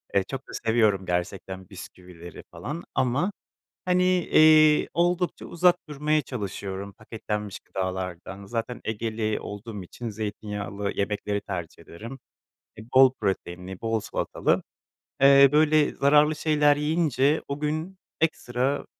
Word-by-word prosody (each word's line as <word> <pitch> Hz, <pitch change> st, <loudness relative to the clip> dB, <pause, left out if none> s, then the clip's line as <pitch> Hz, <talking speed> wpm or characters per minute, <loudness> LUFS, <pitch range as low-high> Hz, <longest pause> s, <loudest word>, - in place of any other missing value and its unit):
Iıı, 100 Hz, -, +4 dB
çok 135 Hz, +6 st, -7 dB
da -, -, -11 dB
seviyorum 110 Hz, -4 st, +1 dB
gerçekten 95 Hz, +1 st, -4 dB
bisküvileri 90 Hz, -3 st, -11 dB
falan, 165 Hz, +4 st, -6 dB
ama 135 Hz, +9 st, +1 dB, 0.5 s
hani, 180 Hz, -1 st, +2 dB
ııı, 155 Hz, -1 st, +6 dB
oldukça 175 Hz, +1 st, 0 dB
uzak 175 Hz, +1 st, +3 dB
durmaya 150 Hz, +1 st, 0 dB
çalışıyorum 100 Hz, -4 st, -5 dB
paketlenmiş 105 Hz, -1 st, -5 dB
gıdalardan. 95 Hz, +1 st, -5 dB
Zaten 115 Hz, +3 st, -4 dB
Egeli 110 Hz, 0 st, -2 dB
olduğum 105 Hz, 0 st, -7 dB
için 115 Hz, +6 st, -7 dB
zeytinyağlı 105 Hz, -1 st, -4 dB
yemekleri 100 Hz, 0 st, -2 dB
tercih 85 Hz, -4 st, -6 dB
ederim. 115 Hz, +11 st, -10 dB, 0.6 s
Iıı, 110 Hz, -, -10 dB
bol 130 Hz, 0 st, +7 dB
proteinli 90 Hz, -1 st, -3 dB
bol 115 Hz, -1 st, -1 dB
salatalı. -, -, -1 dB, 0.6 s
Eee, 140 Hz, 0 st, +8 dB
böyle 155 Hz, 0 st, +4 dB
zararlı 150 Hz, +2 st, +4 dB
şeyler 150 Hz, -1 st, +3 dB
yiyince 150 Hz, -1 st, +1 dB
o 140 Hz, +1 st, -4 dB
gün 155 Hz, +5 st, -3 dB, 0.2 s
ekstra 135 Hz, -3 st, 0 dB
115 Hz, 115 wpm, -26 LUFS, 100-150 Hz, 0.6 s, Eee